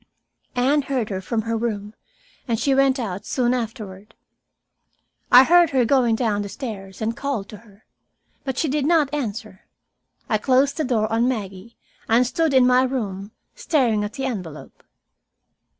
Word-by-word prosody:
Anne 270 +4 +2
heard 265 -5 -2
her 190 -1 -3
from 220 +3 -2
her 230 +1 -2
room, 215 -2 -3 0.5
and 230 -2 -1
she 275 - +1
went 270 0 +3
out 200 -6 -4
soon 245 -2 0
afterward. 220 -4 -6 1.2
I 250 +1 +9
heard 345 +2 +5
her 260 -4 +2
going 240 -3 +3
down 220 -3 0
the 200 - -5
stairs 200 -6 -7
and 225 +1 -1
called 270 -9 -3
to 210 - -9
her. 205 -1 -21 0.6
But 265 -2 -4
she 320 - 0
did 290 0 0
not 310 -4 +2
answer. 220 -7 -5 0.6
I 215 -3 +1
closed 265 +4 +2
the 315 - 0
door 225 -4 +1
on 230 +2 +2
Maggie 215 -2 -5 0.3
and 235 +3 +4
stood 320 +5 0
in 255 -1 +6
my 250 0 +4
room, 210 -7 -3 0.2
staring 255 - +1
at 210 - -5
the 270 -1 -4
envelope. 180 - -7
235 Hz, 165 wpm, -22 LUFS, 210-265 Hz, 1.2 s, I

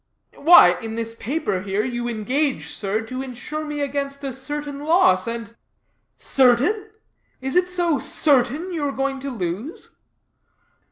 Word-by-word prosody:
"Why, 180 - +7
in 225 0 -5
this 230 0 -3
paper 235 - -2
here, 200 +2 -1
you 240 -1 -3
engage, 255 +6 -1
sir, 205 +2 -2
to 255 +4 -6
insure 270 +4 -5
me 295 -1 -4
against 280 0 -3
a 270 -2 -3
certain 290 +1 -5
loss, 295 - +3
and 230 -1 -5 0.4
" - - -48 0.2
"Certain? 270 - +4 0.5
Is 265 +3 -2
it 360 0 +3
so 345 -5 +1
certain 290 +7 +1
you 320 -3 -2
are 280 - 0
going 270 0 -2
to 275 +1 -5
lose?" 215 - -5
270 Hz, 150 wpm, -22 LUFS, 230-295 Hz, 0.5 s, Why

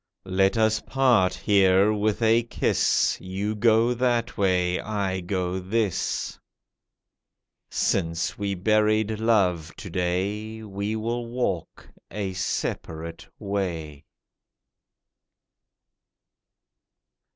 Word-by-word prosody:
Let 95 +2 +2
us 110 0 +3
part 120 -9 +2
here 100 0 +4
with 105 +2 0
a 115 +1 +5
kiss— 120 - +1
You 95 +3 -3
go 115 +2 +3
that 120 -1 0
way, 90 -2 +1
I 100 -3 -2
go 90 0 -2
this. 100 +1 -1 1.3
Since 85 -3 0
we 100 -1 -2
buried 110 +2 +2
Love 90 -8 +1
to 95 - -9
day 100 +5 -2
We 100 +1 -3
will 115 +2 -3
walk 115 -9 -3 0.2
a 100 -2 -4
separate 85 -2 -4
way. 85 -7 -4
100 Hz, 90 wpm, -25 LUFS, 90-110 Hz, 1.3 s, a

